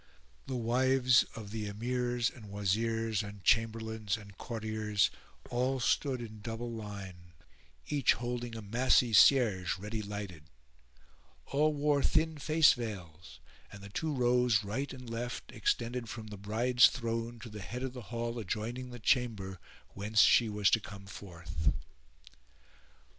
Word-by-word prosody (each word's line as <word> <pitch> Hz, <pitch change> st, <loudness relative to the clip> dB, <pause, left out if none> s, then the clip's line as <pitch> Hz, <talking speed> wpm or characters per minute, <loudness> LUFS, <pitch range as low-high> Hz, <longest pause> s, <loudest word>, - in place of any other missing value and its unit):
The 130 Hz, -, -3 dB
wives 125 Hz, +1 st, +3 dB
of 105 Hz, -3 st, -8 dB
the 110 Hz, -1 st, -3 dB
Emirs 120 Hz, +3 st, -1 dB
and 110 Hz, -5 st, -11 dB
Wazirs 110 Hz, +2 st, 0 dB
and 105 Hz, -2 st, -9 dB
Chamberlains 110 Hz, -2 st, +1 dB
and 100 Hz, -2 st, -13 dB
Courtiers 110 Hz, -2 st, -1 dB, 0.4 s
all 130 Hz, +2 st, 0 dB
stood 130 Hz, +1 st, +1 dB
in 110 Hz, -2 st, -9 dB
double 115 Hz, +2 st, -5 dB
line, 95 Hz, -6 st, -8 dB, 0.5 s
each 145 Hz, -4 st, +3 dB
holding 120 Hz, -1 st, -4 dB
a 110 Hz, -, -6 dB
massy 120 Hz, +2 st, +3 dB
cierge 105 Hz, -7 st, +5 dB
ready 105 Hz, +3 st, -4 dB
lighted; 100 Hz, -6 st, -6 dB, 1.0 s
all 150 Hz, +2 st, +2 dB
wore 145 Hz, 0 st, +2 dB
thin 160 Hz, +1 st, +1 dB
face 155 Hz, +2 st, +5 dB
veils 90 Hz, -, -7 dB, 0.3 s
and 100 Hz, -1 st, -11 dB
the 100 Hz, -, -9 dB
two 155 Hz, +10 st, -2 dB
rows 125 Hz, -4 st, +3 dB
right 125 Hz, +8 st, -3 dB
and 125 Hz, -2 st, -9 dB
left 120 Hz, +1 st, -5 dB
extended 120 Hz, 0 st, -1 dB
from 110 Hz, 0 st, -7 dB
the 105 Hz, -, -7 dB
bride's 120 Hz, +5 st, +4 dB
throne 115 Hz, 0 st, -3 dB
[FN#408] -, -, -15 dB
to 120 Hz, -, -8 dB
the 105 Hz, -1 st, -8 dB
head 125 Hz, +6 st, -5 dB
of 130 Hz, -1 st, -3 dB
the 125 Hz, -, -7 dB
hall 120 Hz, 0 st, -3 dB
adjoining 115 Hz, +4 st, -4 dB
the 120 Hz, -, -8 dB
chamber 105 Hz, -6 st, 0 dB, 0.3 s
whence 105 Hz, +1 st, +2 dB
she 115 Hz, +2 st, +6 dB
was 105 Hz, -1 st, +2 dB
to 115 Hz, -, +5 dB
come 100 Hz, -1 st, -10 dB
forth. 85 Hz, -6 st, -4 dB
115 Hz, 145 wpm, -32 LUFS, 105-125 Hz, 1.0 s, she